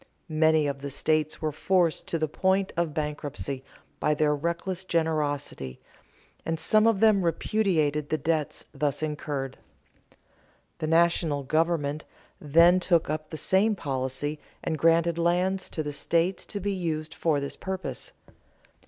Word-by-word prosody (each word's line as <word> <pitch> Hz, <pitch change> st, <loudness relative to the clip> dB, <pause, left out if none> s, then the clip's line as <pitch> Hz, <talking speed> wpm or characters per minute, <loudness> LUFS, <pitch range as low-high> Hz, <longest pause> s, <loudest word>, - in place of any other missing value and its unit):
Many 155 Hz, 0 st, +3 dB
of 140 Hz, -1 st, -3 dB
the 140 Hz, -, -4 dB
states 155 Hz, +2 st, 0 dB
were 155 Hz, -, +1 dB
forced 175 Hz, +2 st, +1 dB
to 165 Hz, -, -1 dB
the 155 Hz, -1 st, 0 dB
point 190 Hz, +5 st, +1 dB
of 170 Hz, -2 st, 0 dB
bankruptcy 145 Hz, -3 st, -4 dB, 0.4 s
by 150 Hz, -, +2 dB
their 150 Hz, 0 st, +2 dB
reckless 170 Hz, +4 st, -3 dB
generosity, 150 Hz, -, -1 dB, 0.6 s
and 165 Hz, -1 st, -2 dB
some 215 Hz, +4 st, +4 dB
of 225 Hz, -4 st, +2 dB
them 215 Hz, -3 st, +5 dB
repudiated 165 Hz, -5 st, +1 dB
the 155 Hz, -, +1 dB
debts 155 Hz, 0 st, -1 dB
thus 150 Hz, 0 st, -1 dB
incurred. 145 Hz, -3 st, -3 dB, 1.2 s
The 155 Hz, -, -2 dB
national 165 Hz, -3 st, +2 dB
government 155 Hz, 0 st, 0 dB, 0.4 s
then 170 Hz, +5 st, +5 dB
took 170 Hz, -4 st, +2 dB
up 155 Hz, 0 st, -4 dB
the 155 Hz, -, -6 dB
same 205 Hz, +6 st, +3 dB
policy 135 Hz, -1 st, -3 dB, 0.2 s
and 160 Hz, -, -1 dB
granted 165 Hz, +2 st, +3 dB
lands 180 Hz, +3 st, +1 dB
to 155 Hz, -, -3 dB
the 145 Hz, -1 st, -4 dB
states 170 Hz, +5 st, 0 dB
to 205 Hz, -, -4 dB
be 200 Hz, +1 st, -1 dB
used 160 Hz, -4 st, -3 dB
for 155 Hz, -4 st, +1 dB
this 140 Hz, 0 st, -4 dB
purpose. 190 Hz, -1 st, -5 dB
160 Hz, 145 wpm, -27 LUFS, 150-175 Hz, 1.2 s, them